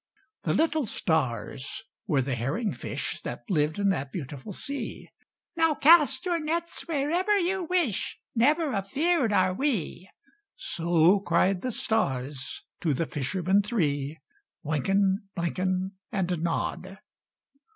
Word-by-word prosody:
The - - 0
little 315 -5 +2
stars 130 - -2 0.2
were 145 -8 +2
the 135 +1 -2
herring 140 - -1
fish - - -4
That - - -6
lived 155 -1 +1
in 200 -1 +2
that 140 -7 -1
beautiful 145 +2 -6
sea 280 +8 -5 0.5
"Now 325 -2 +3
cast 295 -2 +5
your 345 -2 +1
nets 335 +3 -3
wherever 340 +7 +1
you 375 0 0
wish 330 - 0 0.2
Never 290 +5 +3
afeared 260 - +1
are 185 -2 +3
we": 190 - -2 0.5
So 175 - +3
cried 185 0 +2
the 255 - -2
stars 140 - -2 0.2
to 155 -5 +1
the 165 - 0
fishermen 185 +8 +1
three: 155 - -1 0.5
Wynken, 195 +6 +1
Blynken, 185 +2 -1 0.2
And 180 -4 -1
Nod. 175 +3 -2
195 Hz, 120 wpm, -27 LUFS, -, 0.5 s, cast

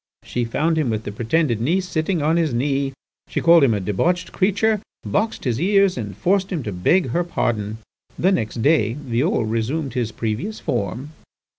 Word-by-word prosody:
She 120 -1 -2
found 160 +7 0
him 145 -6 0
with 110 -1 -2
the 105 - -5
pretended 120 +2 0
niece 180 +9 +1
sitting 160 -1 -1
on 160 +2 +2
his 160 -7 +1
knee. 135 +2 0 0.4
She - - -2
called 170 -2 +6
him 120 -5 +4
a - - -1
debauched 170 - 0
creature, 205 +2 +1 0.2
boxed 220 +2 -1
his 125 0 -1
ears, 195 0 +3
and 105 -5 -5
forced 190 - +1
him 165 -7 -2
to 105 - -4
beg 125 - +2
her 175 +9 +1
pardon. 110 -10 -2 0.4
The 185 - +3
next 115 - -1
day 140 -8 +3
Violle 130 -1 0
resumed 125 +6 -2
his 120 -3 -1
previous 115 - -3
form." 115 +10 -3
140 Hz, 180 wpm, -21 LUFS, 115-175 Hz, 0.4 s, called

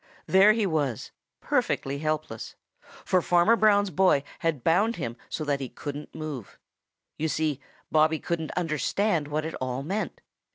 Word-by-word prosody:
There 195 +3 +6
he 220 -1 +1
was, 145 - -1 0.3
perfectly 140 +1 0
helpless, 155 -7 -3 0.5
for 185 - +3
Farmer 175 +7 +4
Brown's 205 -3 +4
boy 180 -4 +3 0.2
had 160 -7 -1
bound 205 +8 +3
him 115 -7 -4
so 155 - -3
that 145 -2 0
he 135 -2 -5
couldn't 145 +1 -7
move. 150 -8 -6 0.6
You 160 - +1
see, 155 -3 -1 0.3
Bobby 155 +1 +4
couldn't 160 -1 -3
understand 165 +1 0
what 155 +1 -2
it 160 - -4
all 130 +1 -2
meant. 195 +8 -3
155 Hz, 150 wpm, -27 LUFS, 145-185 Hz, 0.6 s, There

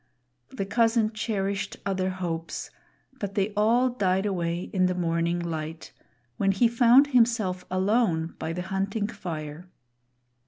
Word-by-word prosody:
The 195 - -4
cousin 225 +1 +2
cherished 200 -3 -2
other 190 -1 0
hopes, 170 -3 -4 0.5
but 200 -1 -4
they 205 +1 0
all 230 +5 +3
died 190 -5 0
away 175 -3 -2
in 185 -2 +3
the 180 - -1
morning 170 0 0
light, 160 -1 -5 0.4
when 195 -1 +2
he 235 +5 +4
found 240 +3 +6
himself 225 -7 +2
alone 185 -4 +1
by 160 - -3
the 180 +2 -4
Hunting 195 +3 -2
fire. 165 -4 -6
190 Hz, 130 wpm, -26 LUFS, 175-215 Hz, 0.5 s, found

